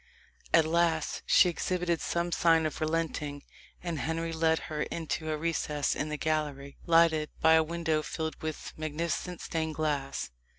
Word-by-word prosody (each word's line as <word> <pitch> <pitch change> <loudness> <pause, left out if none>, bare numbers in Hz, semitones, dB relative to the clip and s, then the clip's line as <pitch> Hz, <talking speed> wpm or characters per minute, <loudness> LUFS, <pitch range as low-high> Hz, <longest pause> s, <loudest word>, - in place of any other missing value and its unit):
At 160 -2 +5
last 165 -1 +1
she 185 - +6
exhibited 175 -1 -1
some 170 0 -1
signs 165 -2 +4
of 155 - -3
relenting, 155 -3 -2 0.4
and 170 -4 -3
Henry 165 +3 -2
led 160 0 +2
her 150 -1 -4
into 160 -1 -3
a 155 - 0
recess 150 -2 -1
in 150 - -2
the 150 - -3
gallery, 145 -3 -2
lighted 165 -2 +4
by 160 - +6
a 160 - +6
window 160 -1 0
filled 160 +1 -4
with 155 -1 -5
magnificent 165 +3 -3
stained 160 -2 -2
glass. 145 - -2
160 Hz, 155 wpm, -30 LUFS, 155-165 Hz, 0.4 s, she